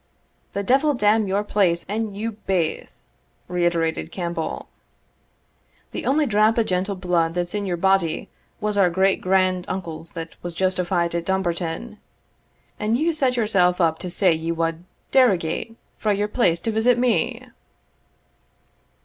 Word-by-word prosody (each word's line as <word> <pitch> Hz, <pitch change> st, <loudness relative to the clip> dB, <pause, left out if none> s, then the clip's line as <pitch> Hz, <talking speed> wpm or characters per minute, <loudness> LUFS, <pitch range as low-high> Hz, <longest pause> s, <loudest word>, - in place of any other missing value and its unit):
] -, -, -42 dB
"The 200 Hz, -, -2 dB
devil 275 Hz, +6 st, +3 dB
damn 210 Hz, -1 st, +3 dB
your 195 Hz, +2 st, 0 dB
place 185 Hz, -5 st, +1 dB
and 210 Hz, 0 st, -3 dB
you 225 Hz, +2 st, -2 dB
baith!" 190 Hz, -6 st, -2 dB, 0.6 s
reiterated 170 Hz, -2 st, 0 dB
Campbell. 170 Hz, -3 st, -4 dB, 1.2 s
"The -, -, -5 dB
only 295 Hz, +3 st, +3 dB
drap 215 Hz, -1 st, +3 dB
o' 230 Hz, -, +4 dB
gentle 190 Hz, 0 st, -1 dB
bluid 175 Hz, -3 st, 0 dB
that's 175 Hz, -1 st, -2 dB
in 205 Hz, -1 st, -2 dB
your 175 Hz, -2 st, -1 dB
body 190 Hz, -3 st, +1 dB, 0.3 s
was 210 Hz, -1 st, -1 dB
our 185 Hz, -2 st, +5 dB
great 190 Hz, +2 st, +2 dB
grand 185 Hz, -1 st, +2 dB
uncle's 165 Hz, -3 st, -6 dB
that 165 Hz, -1 st, -6 dB
was 175 Hz, -1 st, -6 dB
justified* 180 Hz, -2 st, 0 dB
at 170 Hz, -1 st, -2 dB
Dumbarton, 190 Hz, +3 st, -2 dB, 0.8 s
and 215 Hz, +2 st, +1 dB
you 325 Hz, +4 st, +1 dB
set 265 Hz, -5 st, +1 dB
yourself 185 Hz, -6 st, +2 dB
up 160 Hz, -2 st, +2 dB
to 180 Hz, -, -5 dB
say 180 Hz, 0 st, +3 dB
ye 160 Hz, +1 st, -2 dB
wad 165 Hz, +1 st, -2 dB, 0.3 s
derogate 225 Hz, -4 st, +2 dB, 0.2 s
frae 210 Hz, -2 st, +1 dB
your 205 Hz, +1 st, 0 dB
place 180 Hz, -7 st, +1 dB
to 225 Hz, -, -1 dB
visit 225 Hz, +3 st, +3 dB
me! 245 Hz, +1 st, 0 dB
190 Hz, 150 wpm, -23 LUFS, 170-215 Hz, 1.2 s, our